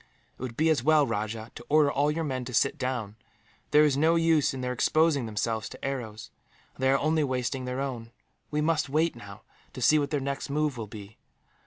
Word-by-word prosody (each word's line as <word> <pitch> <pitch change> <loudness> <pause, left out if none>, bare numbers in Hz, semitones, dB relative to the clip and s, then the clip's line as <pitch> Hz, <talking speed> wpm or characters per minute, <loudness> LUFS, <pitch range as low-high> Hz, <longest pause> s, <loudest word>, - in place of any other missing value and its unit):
"It - - -13
would 125 -3 -6
be 160 +1 +3
as 150 - +2
well, 150 +2 +4
Rajah, 110 0 -4
to 120 - -11
order 150 -1 +4
all 145 +2 +1
your 160 +2 -1
men 130 -4 -3
to 125 -1 -5
sit 140 +4 +2
down. 125 -5 -3 0.5
There 150 0 +6
is 145 -3 +3
no 160 +4 +3
use 165 -3 +3
in 130 - -6
their 125 0 -2
exposing 150 0 +2
themselves 110 +1 -2
to - - -10
the - - -8
arrows, 115 -6 -5 0.4
and - - -13
they 130 - +3
are 135 - +4
only 155 +2 +1
wasting 130 -1 -2
their 125 +1 -3
own. 120 -4 -5 0.4
We 150 0 -1
must 155 -2 +1
wait, 155 +2 +1
now, 105 -2 -11 0.3
to 130 - -8
see 150 +5 +5
what 145 -1 -1
their 145 - 0
next 140 +1 -4
move 150 -1 0
will 115 -3 -6
be. 105 0 -11
135 Hz, 225 wpm, -27 LUFS, 120-150 Hz, 0.5 s, There